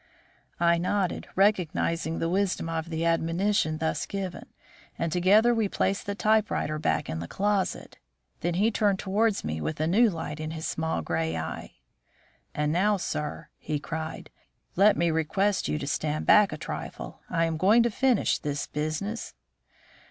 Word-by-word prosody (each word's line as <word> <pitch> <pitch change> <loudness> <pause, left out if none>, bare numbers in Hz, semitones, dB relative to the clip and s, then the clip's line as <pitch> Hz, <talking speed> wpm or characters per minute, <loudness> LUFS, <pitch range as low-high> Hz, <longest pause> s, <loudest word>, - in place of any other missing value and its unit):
I 170 0 +3
nodded, 185 +1 -1
recognising 170 -4 +1
the 165 - -1
wisdom 185 -1 0
of 165 0 -3
the 165 0 -2
admonition 165 0 +1
thus 160 0 -2
given, 190 -3 -5 0.5
and 165 -1 -1
together 205 +8 +4
we 220 -3 +1
placed 195 +1 -1
the 200 - -2
typewriter 215 -8 +1
back 150 - 0
in 80 - -4
the 85 - -5
closet. 200 - -1 0.4
Then 175 0 -1
he 210 +5 +3
turned 205 -3 +2
towards 205 +2 0
me 80 0 -3
with 75 - -3
a 155 - +1
new 215 +8 +4
light 160 -4 -5
in 155 0 -4
his 160 0 -5
small 160 - -2
grey 80 0 -1
eye. 80 -6 -6 0.8
"And 150 0 0
now, 205 +4 +3
sir," 150 -4 -4
he 150 0 -2
cried, 160 +2 -6 0.4
"let 200 +3 +5
me 170 -1 +2
request 190 +6 0
you 150 - -1
to 145 - -4
stand 150 +1 -2
back 210 -1 +6
a - - -5
trifle. - - -7
I 165 -2 +1
am 165 -1 -2
going 210 +8 +5
to 235 - +1
finish 255 -1 +2
this 145 -1 -3
business." 155 +9 -4
170 Hz, 165 wpm, -27 LUFS, 155-200 Hz, 0.8 s, back